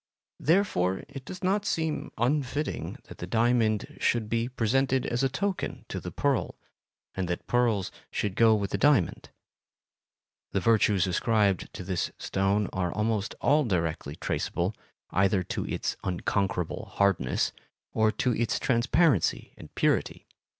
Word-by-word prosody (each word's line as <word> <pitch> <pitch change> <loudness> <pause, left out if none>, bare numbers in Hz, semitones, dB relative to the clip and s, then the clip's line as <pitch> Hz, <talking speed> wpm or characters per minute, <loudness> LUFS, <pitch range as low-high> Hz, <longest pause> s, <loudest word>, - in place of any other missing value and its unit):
Therefore 150 - +2
it 135 -1 -9
does 185 0 -8
not 200 +2 +2
seem 160 -6 -1
unfitting 140 +4 -1
that - - -13
the 90 - -5
diamond 115 -1 +1
should 115 -3 +1
be 115 +1 0
presented 130 +2 +1
as 120 +2 -1
a 135 - +2
token 195 +7 -3
to - - -3
the - - -6
pearl, - - 0 0.6
and 95 -2 -2
that 90 0 -3
pearls 115 -6 +1 0.2
should 105 - -2
go 115 -1 +6
with 100 -2 -2
the - - -1
diamond. 145 - +2 1.2
The 100 - +2
virtues 105 -2 +3
ascribed 100 +1 +1
to - - -6
this 90 -1 -1
stone 100 +1 0
are 90 -2 -1
almost 105 0 -1
all 150 +1 +4
directly 85 - -1
traceable 90 +5 -2 0.4
either 95 0 +2
to - - -4
its - - -2
unconquerable 90 -1 -1
hardness 95 -10 +1 0.4
or 110 0 +3
to 125 +2 0
its 115 -1 0
transparency 130 - +2
and - - -12
purity. - - +1
110 Hz, 140 wpm, -28 LUFS, 95-130 Hz, 1.2 s, go